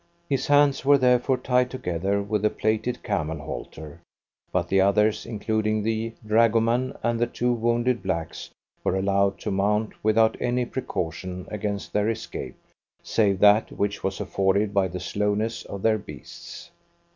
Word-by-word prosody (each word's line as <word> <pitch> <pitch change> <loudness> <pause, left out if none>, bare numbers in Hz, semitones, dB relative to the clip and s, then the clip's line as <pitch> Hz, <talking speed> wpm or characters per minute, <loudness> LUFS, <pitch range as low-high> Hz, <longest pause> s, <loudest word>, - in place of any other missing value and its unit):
His 135 -3 -1
hands 145 -1 +4
were 140 +1 +6
therefore 125 0 +3
tied 125 0 +1
together 100 -4 -2
with 105 0 -2
a 105 - +4
plaited 110 +4 -1
camel 80 -7 -2
halter, 75 +1 -8 0.5
but 85 -2 0
the 95 +2 +3
others, 105 +2 +2
including 110 -1 -1
the 115 +1 -2
dragoman 115 +3 +2
and 120 -1 0
the 120 - +2
two 120 +1 0
wounded 120 +1 0
blacks, 85 -4 -4 0.3
were - - +1
allowed 100 0 +1
to - - -3
mount 105 +3 0
without 110 +1 +3
any 125 0 0
precaution 90 -6 -4
against 105 -1 -4
their 105 +1 +1
escape, 110 -1 -5 0.5
save 100 -4 +1
that 105 +1 +5
which 100 0 -2
was 95 0 -2
afforded 100 +1 0
by 100 -2 +2
the 90 +1 -6
slowness 105 +5 -1
of 100 - -7
their 110 -1 +3
beasts. 75 -9 -11
105 Hz, 150 wpm, -25 LUFS, 95-115 Hz, 0.5 s, were